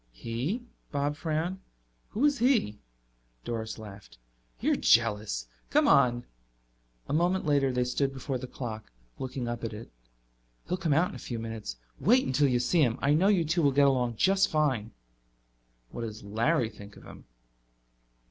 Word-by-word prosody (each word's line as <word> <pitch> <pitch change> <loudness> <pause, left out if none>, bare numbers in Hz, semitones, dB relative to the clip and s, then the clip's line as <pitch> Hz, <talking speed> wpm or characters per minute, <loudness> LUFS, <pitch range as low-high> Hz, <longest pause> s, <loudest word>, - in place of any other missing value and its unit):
"He?" 120 - -3 0.3
Bob 145 0 -1
frowned. 165 +4 -2 0.5
"Who 235 +8 0
is 290 -2 +2
he?" 230 - +2 0.7
Doris 110 -1 -4
laughed. 100 - -11 0.4
"You're - - +2
jealous! 105 - +2 0.2
Come - - +3
on." 120 -1 +4 0.8
A - - -3
moment 175 +4 +1
later 140 -3 +2
they 125 0 +1
stood 135 +2 0
before 135 -1 -4
the 130 - -6
clock, 110 - -7 0.3
looking 130 -1 -4
up 120 0 -4
at 115 - -3
it. 110 +2 -9 0.8
"He'll 180 - -1
come 165 -5 0
out 165 +5 +3
in - - -9
a - - -8
few 120 - -5
minutes. 115 - -5 0.2
Wait 250 +6 +4
until 140 +2 +2
you 125 -2 +2
see 155 +7 +2
him. 120 -4 +2
I 140 +1 +2
know 175 +6 +3
you 190 -5 +3
two 165 +3 +1
will 140 -3 +4
get 140 +1 +4
along 125 -4 +2
just 195 - +3
fine." 135 -8 0 1.0
"What - - -6
does 110 -2 -6
Larry 115 +5 +1
think 100 -1 -13
of - - -15
him?" - - -13
130 Hz, 165 wpm, -29 LUFS, 115-160 Hz, 1.0 s, on